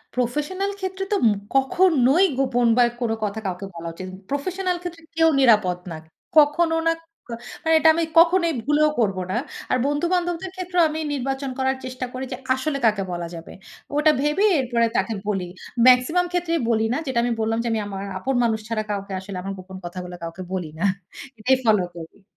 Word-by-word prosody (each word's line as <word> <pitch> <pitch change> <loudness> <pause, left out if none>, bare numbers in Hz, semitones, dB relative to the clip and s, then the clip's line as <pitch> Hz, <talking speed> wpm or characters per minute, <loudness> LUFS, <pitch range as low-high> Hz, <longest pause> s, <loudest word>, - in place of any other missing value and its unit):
Professional 300 +11 -1
ক্ষেত্রে 380 0 -3
তো 415 - +3
উম 220 - +5 0.2
কখনোই 285 +2 +4
গোপন 245 -3 +2
বা 245 - +7 0.2
কোনো 225 -2 0
কথা 210 +1 -2
কাউকে 185 +1 -3
বলা 170 0 -6
উচিত 185 +3 -8
ন - - -13 0.2
প্রফেশনাল 360 +5 -1
ক্ষেত্রে 345 -2 -7
কেউ 325 0 +5
নিরাপদ 210 -8 +4
না। 160 - -5 0.4
কখনো 325 +3 +5
না, 330 - +4 0.3
ক - - -30 0.3
মানে 320 0 +3
এটা 320 - +6
আমি 335 - +1 0.2
কখনোই 335 0 +4
ভুলেও 300 +3 +3
করব 195 -5 +1
না। - - -1 0.4
আর - - +3
বন্ধু-বান্ধবদের 350 +4 -1
ক্ষেত্রেও 360 -1 0
আমি 310 +1 -4
নির্বাচন 270 0 -2
করার 265 0 +1
চেষ্টা 255 0 -4
করি 255 +1 -4
যে, 255 - -3 0.2
আসলে 275 +2 -2
কাকে 210 -3 +2
বলা 175 -1 -4
যাবে, 165 0 -10 0.5
ওটা 305 +1 +5
ভেবে 300 +8 +2
এরপরে 235 -2 +1
তাকে 230 - 0
বলি। 195 -3 0 0.4
মেক্সিমাম 255 +9 +5
ক্ষেত্রেই 340 -2 0
বলি 220 -1 +2
না। - - 0
যেটা 260 -3 0
আমি 245 - 0
বললাম 225 +1 0
যে, - - -2
আমি 225 - 0
আমার 195 -1 -5 0.2
আপন 265 +7 -1
মানুষ 225 -2 +1
ছাড়া 220 -2 -1
কাউকে 200 -1 -4
আসলে 190 0 -7
আমার 195 +2 -5
গোপন 185 +1 -10
কথাগুলো 180 0 -6
কাউকে 165 +3 -6
বলি 180 -3 -2
না। - - -2 0.6
এটাই 260 +5 +3
ফলো 210 -4 +4
করি। 170 +4 -11
255 Hz, 190 wpm, -23 LUFS, 210-330 Hz, 0.6 s, বা